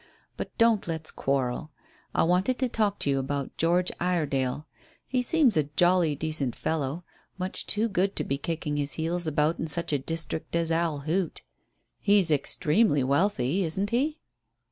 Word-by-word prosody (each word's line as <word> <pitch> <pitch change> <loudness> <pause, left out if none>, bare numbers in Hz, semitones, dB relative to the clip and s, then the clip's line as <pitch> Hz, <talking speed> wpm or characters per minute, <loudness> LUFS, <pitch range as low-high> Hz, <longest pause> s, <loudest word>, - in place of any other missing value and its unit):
But - - -7
don't 230 -4 +3
let's 160 -2 -3
quarrel. 135 +1 -1 0.5
I - - +4
wanted 180 +9 +2
to 260 - +1
talk 210 -4 0
to - - 0
you 135 - +1
about 140 0 -3
George 175 +2 +2
Iredale. 150 -6 0 0.4
He 255 -1 0
seems 260 -3 +3
a 155 - +2
jolly 175 -4 +4
decent 150 -4 -1
fellow 155 +1 -2 0.3
much 185 0 -4
too 215 +2 +2
good 195 -1 0
to - - 0
be 140 0 -2
kicking 150 -1 -3
his 145 -1 -2
heels 165 +1 -1
about 155 +2 +1
in 160 - -2
such 170 0 -1
a 145 - +2
district 165 +3 -4
as 165 -1 +1
Owl 165 -3 0
Hoot. 165 +4 -2 0.6
He's 200 -5 +4
extremely 150 - +2
wealthy, 145 +3 +1
isn't 190 +5 -1
he?" 290 +6 +1
165 Hz, 165 wpm, -27 LUFS, 145-190 Hz, 0.6 s, I